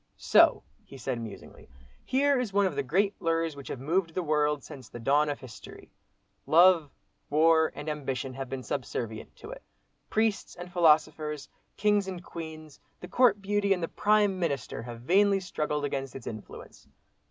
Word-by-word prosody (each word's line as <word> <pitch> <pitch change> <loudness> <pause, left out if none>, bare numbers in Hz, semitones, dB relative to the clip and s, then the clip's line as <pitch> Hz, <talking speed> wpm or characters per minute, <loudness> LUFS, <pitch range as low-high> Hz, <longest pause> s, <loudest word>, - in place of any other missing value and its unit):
"So," - - +4 0.2
he 135 - -13
said 125 -2 -3
musingly, 110 -9 -10 0.3
"here 275 +1 +2
is 245 -5 -2
one 200 0 +3
of 185 -6 -1
the 140 - 0
great 190 +10 +1
lures 165 -2 0
which 140 -1 -10
have - - -5
moved 165 +4 -1
the 185 - -1
world 150 -2 +1
since 130 - -11
the 120 - -9
dawn 145 +5 +2
of 145 - -3
history. 120 -4 -12 0.6
Love, 170 -2 +5 0.4
war, 160 +2 +4
and 145 - -7
ambition, 135 -3 -3
have 135 0 -6
been 135 -1 -5
subservient 115 -5 -5
to 430 - -11
it. - - -9 0.5
Priests 220 -1 0
and 175 0 -10
philosophers, 155 -3 +2 0.3
kings 205 -1 +2
and 180 -2 -6
queens, 160 -3 -9 0.2
the 180 - -9
court 205 0 +3
beauty 200 0 +2
and 180 -3 -4
the - - 0
Prime 205 -1 +2
Minister, 145 -10 -2
have 120 0 -8
vainly 195 +8 +3
struggled 150 -5 -2
against 135 -2 -4
its 135 - -8
influence. 110 -2 -10
160 Hz, 170 wpm, -28 LUFS, 140-190 Hz, 0.6 s, Love